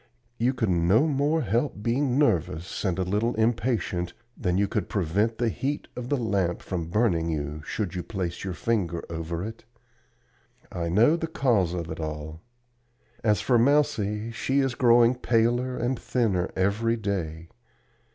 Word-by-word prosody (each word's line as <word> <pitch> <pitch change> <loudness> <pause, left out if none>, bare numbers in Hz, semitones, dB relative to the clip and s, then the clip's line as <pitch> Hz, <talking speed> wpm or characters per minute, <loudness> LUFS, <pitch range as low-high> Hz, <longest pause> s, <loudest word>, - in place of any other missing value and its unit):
You 125 +3 +2
could 110 -6 0
no 90 - +4
more 150 +1 +1
help 115 +1 -1
being 125 +2 +1
nervous 90 - 0
and 95 -4 0
a 95 - +1
little 105 +6 0
impatient 110 -6 0 0.2
than 90 -1 0
you 100 +1 +2
could 100 -2 -2
prevent 105 +3 0
the 120 -1 +1
heat 140 +6 -3
of 125 0 -6
the 145 - +2
lamp 100 -7 -1
from 85 -4 -3
burning 85 -5 +1
you, 75 -1 -3
should 100 -6 -3
you 90 - -3
place 90 -3 -4
your 95 -2 -4
finger 90 -8 -1
over 85 +2 -3
it. 115 +1 -8 1.1
I 85 -2 -3
know 110 - +5
the 165 - -3
cause 115 - +1
of 85 -2 -4
it 80 - -6
all. 80 0 -5 0.8
As 105 -2 +2
for 120 -3 +3
Mousie, 115 -5 +2
she 135 +4 -1
is 135 -2 +1
growing 120 0 +5
paler 120 +1 +1
and 120 +1 -1
thinner 100 -8 0
every 105 +5 +1
day. 85 -6 -3
105 Hz, 160 wpm, -26 LUFS, 90-120 Hz, 1.1 s, know